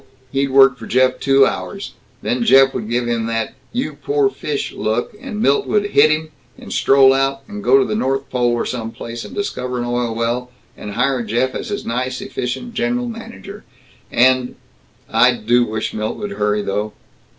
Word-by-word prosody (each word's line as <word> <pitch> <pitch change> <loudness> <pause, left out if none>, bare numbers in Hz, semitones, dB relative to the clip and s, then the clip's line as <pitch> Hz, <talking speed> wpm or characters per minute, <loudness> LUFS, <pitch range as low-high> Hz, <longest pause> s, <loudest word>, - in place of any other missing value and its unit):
He'd 140 0 0
work 135 -1 +5
for 115 - -8
Jeff 130 +1 +2
two 135 0 +5
hours. 200 +8 -4 0.3
Then 245 -1 0
Jeff 135 -10 +6
would 110 -2 -4
give 120 0 0
him 115 -1 -1
that 115 -1 -2 0.2
'You 250 +3 -2
poor 425 -1 0
fish!' 150 - -4
look, 110 - -2
and 225 -6 -4
Milt 140 - +2
would 205 -1 0
hit 150 +2 +6
him, 155 +1 0 0.3
and - - -8
stroll 135 -1 +5
out, 135 0 0
and 205 0 -7
go 410 - +5
to 400 - +3
the - - -3
North 135 - -1
Pole 120 -1 +1
or 120 - -1
some 115 -3 -4
place, 115 +1 -7
and - - -10
discover 125 -11 -3
an 120 - -2
oil 120 -1 -1
well, 120 +2 -1 0.3
and 105 - -7
hire 125 +3 +1
Jeff 120 +4 0
as 235 - -5
his 205 - -4
nice, 125 +2 -2
efficient 130 - -4
general 240 +2 -1
manager. 225 - -9 0.5
And 130 +1 +3 0.5
I 125 +1 +4
do 120 +2 +2
wish 110 0 -3
Milt 110 0 -3
would 205 -1 -5
hurry, 105 - 0
though!" 105 +2 -2
130 Hz, 190 wpm, -19 LUFS, 120-160 Hz, 0.5 s, Jeff